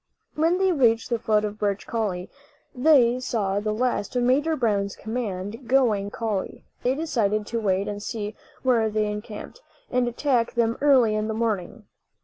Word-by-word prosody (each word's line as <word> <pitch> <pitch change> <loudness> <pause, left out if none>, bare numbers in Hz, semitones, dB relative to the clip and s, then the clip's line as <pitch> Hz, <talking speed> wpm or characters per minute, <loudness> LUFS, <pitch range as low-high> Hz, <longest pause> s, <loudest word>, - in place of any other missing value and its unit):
When 330 +3 +2
they 380 0 +2
reached 240 -6 +2
the 235 - +1
foot 215 -1 +2
of 210 0 -5
Birch 200 -1 -1
Coulie 200 -5 -2 0.5
they 250 -3 +4
saw 205 -6 -1
the 215 +1 -2
last 245 0 -1
of 245 - +2
Major 290 +6 +2
Brown's 205 -6 0
command 220 0 -5
going 230 -6 +3
up 205 - -9
the - - -8
coulie. 215 -4 -3 0.2
They 255 +2 +1
decided 215 -9 0
to 230 +2 -2
wait 195 -1 +1
and 205 0 -4
see 210 0 -4 0.3
where 235 -4 +3
they 215 0 0
encamped, 210 - -6 0.3
and 250 -1 +2
attack 240 -1 0
them 230 -1 +2
early 260 -7 +5
in 215 0 -1
the 220 - -2
morning. 220 -1 -2
225 Hz, 175 wpm, -25 LUFS, 210-250 Hz, 0.5 s, early